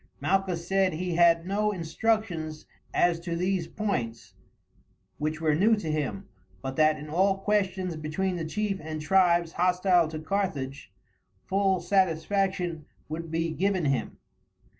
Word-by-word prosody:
Malchus 185 -3 0
said 190 -1 +2
he 180 +2 -2
had 170 0 +4
no 210 +2 +1
instructions 170 -3 -1 0.3
as 175 -1 +2
to 170 0 -4
these 180 0 0
points, 125 - -3 0.9
which 155 +1 -2
were 160 -2 +2
new 210 +9 +4
to 175 -7 -3
him, 140 -10 -3 0.4
but 135 0 -4
that 155 +1 +4
in 150 0 -8
all 190 +5 +2
questions 190 -3 0
between 155 +5 -2
the 170 - -3
chief 195 +4 -2
and 155 0 -5
tribes 175 -1 +3
hostile 180 -1 +3
to 155 0 -6
Carthage, 155 - -3 0.5
full 195 -1 +2
satisfaction 180 -1 0 0.2
would 165 +1 -5
be 165 +1 -1
given 185 0 0
him. 135 -2 -1
175 Hz, 140 wpm, -27 LUFS, 155-195 Hz, 0.9 s, had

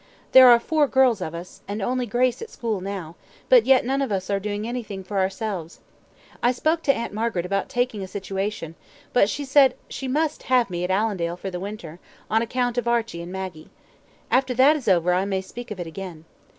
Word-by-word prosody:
There 260 -1 +9
are 240 -1 +8
four 300 +4 +1
girls 260 -6 +3
of 165 -2 -4
us, 175 +2 -9
and 205 +2 -4
only 250 +4 -1
Grace 245 - +1
at 455 - -7
school 220 -5 -3
now, 185 -4 -6 0.3
but - - +6
yet 265 -2 +5
none 270 +2 0
of 270 - -1
us 190 0 -2
are 200 - +1
doing 210 +2 -3
anything 220 -6 -5
for 195 +1 -3
ourselves. 190 -3 -3 0.6
I 240 - +4
spoke 315 +6 0
to 280 - +3
Aunt 230 - -4
Margaret 215 -5 -1
about 195 +2 -1
taking 245 -4 -1
a 190 - -5
situation, 195 -3 -4 0.4
but 210 -5 +4
she 285 +4 -3
said 275 0 +5
she 270 - -5
must 305 +3 0
have 250 -5 +3
me 175 0 -3
at 180 - -2
Allendale 190 -4 0
for 190 +1 -6
the 180 - -4
winter, 180 -4 -7 0.3
on 220 +1 +3
account 245 +1 -1
of 240 - -5
Archie 230 -7 0
and 170 +1 -8
Maggie. 185 -4 -6 0.6
After 260 -1 +2
that 270 +5 +6
is 290 - -6
over, 180 -2 +3
I 185 +1 +2
may 195 -1 -1
speak 240 +6 -9
of 210 -3 -6
it 175 - -3
again. 165 -1 -8
210 Hz, 215 wpm, -24 LUFS, 190-250 Hz, 0.6 s, There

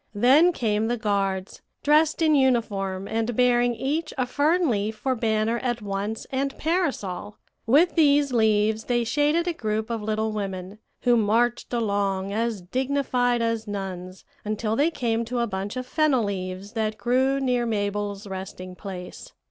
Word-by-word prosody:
Then 270 +11 +5
came 220 -7 0
the 240 +1 0
guards, 195 -3 -2 0.2
dressed 305 +2 +3
in 310 -1 +4
uniform, 205 -8 +1
and 225 +1 -1
bearing 245 0 +3
each 300 +7 -2
a 255 - +1
fern 315 +7 +2
leaf 215 -2 -1
for 260 +4 -1
banner 225 0 0
at 240 -1 -2
once 205 +1 -4
and 275 +1 -2
parasol. 280 - -2 0.3
With 305 +9 +5
these 290 -4 +3
leaves 220 -1 +2
they 240 -1 +1
shaded 295 +8 +1
a 350 - 0
group 220 -4 -2
of 230 -2 -2
little 220 +1 -1
women, 195 -1 -5 0.2
who 245 -1 +4
marched 230 +3 +1
along 200 -4 -1
as 225 -3 -1
dignified 250 +1 0
as 230 -1 -1
nuns 185 -2 -6 0.2
until 215 +1 -1
they 290 +7 +3
came 235 -7 -1
to 245 +2 -4
a 235 - +2
bunch 200 +2 -4
of 255 - -3
fennel 285 -3 +2
leaves 190 0 -4
that 215 -1 -2
grew 260 +3 +1
near 250 -3 0
Mabel's 205 -1 -2
resting 185 -1 -7
place. 180 -2 -9
225 Hz, 155 wpm, -25 LUFS, 205-260 Hz, 0.3 s, Then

